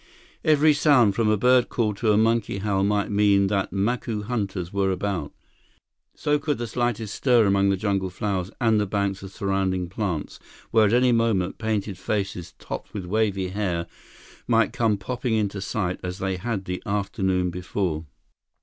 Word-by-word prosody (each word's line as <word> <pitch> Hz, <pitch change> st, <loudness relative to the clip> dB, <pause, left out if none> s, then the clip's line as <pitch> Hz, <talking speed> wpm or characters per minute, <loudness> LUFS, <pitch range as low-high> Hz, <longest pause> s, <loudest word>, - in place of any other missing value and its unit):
Every 155 Hz, 0 st, +5 dB
sound, 140 Hz, -8 st, +4 dB
from 110 Hz, +1 st, +1 dB
a 110 Hz, -, +3 dB
bird 125 Hz, +3 st, +4 dB
call 110 Hz, -3 st, 0 dB
to 105 Hz, +2 st, +1 dB
a 105 Hz, -, +4 dB
monkey 115 Hz, -2 st, +1 dB
howl 100 Hz, -1 st, 0 dB
might 105 Hz, +1 st, +1 dB
mean 100 Hz, -1 st, +4 dB
that 100 Hz, -1 st, 0 dB
Macu 105 Hz, +2 st, -1 dB
hunters 100 Hz, -6 st, -3 dB
were 100 Hz, -1 st, +1 dB
about. 95 Hz, -4 st, -2 dB, 0.8 s
So 150 Hz, 0 st, +1 dB
could 150 Hz, 0 st, -1 dB
the 120 Hz, -, -3 dB
slightest 115 Hz, -2 st, -2 dB
stir 120 Hz, -4 st, +3 dB
among 100 Hz, 0 st, +3 dB
the 100 Hz, -, +1 dB
jungle 95 Hz, -2 st, -1 dB
flowers 95 Hz, -1 st, -2 dB
and 110 Hz, -3 st, +3 dB
the 105 Hz, -, 0 dB
banks 100 Hz, -1 st, -1 dB
of 95 Hz, -1 st, -9 dB
surrounding 95 Hz, -3 st, -1 dB
plants, 95 Hz, -6 st, -3 dB, 0.3 s
where 110 Hz, -2 st, +5 dB
at 105 Hz, -, 0 dB
any 125 Hz, +1 st, +4 dB
moment, 115 Hz, -6 st, +1 dB
painted 105 Hz, -3 st, -2 dB
faces 95 Hz, -5 st, -3 dB
topped -, -, -7 dB
with 95 Hz, -3 st, -4 dB
wavy 100 Hz, -1 st, 0 dB
hair 90 Hz, -4 st, -2 dB, 0.6 s
might 115 Hz, -1 st, +3 dB
come 115 Hz, -5 st, +1 dB
popping 125 Hz, +3 st, -2 dB
into 100 Hz, -2 st, -1 dB
sight 95 Hz, -1 st, -2 dB
as 90 Hz, 0 st, -5 dB
they 95 Hz, -1 st, -2 dB
had 105 Hz, -1 st, -3 dB
the 90 Hz, 0 st, -4 dB
afternoon 95 Hz, -3 st, 0 dB
before. 90 Hz, -2 st, -3 dB
100 Hz, 170 wpm, -24 LUFS, 95-115 Hz, 0.8 s, Every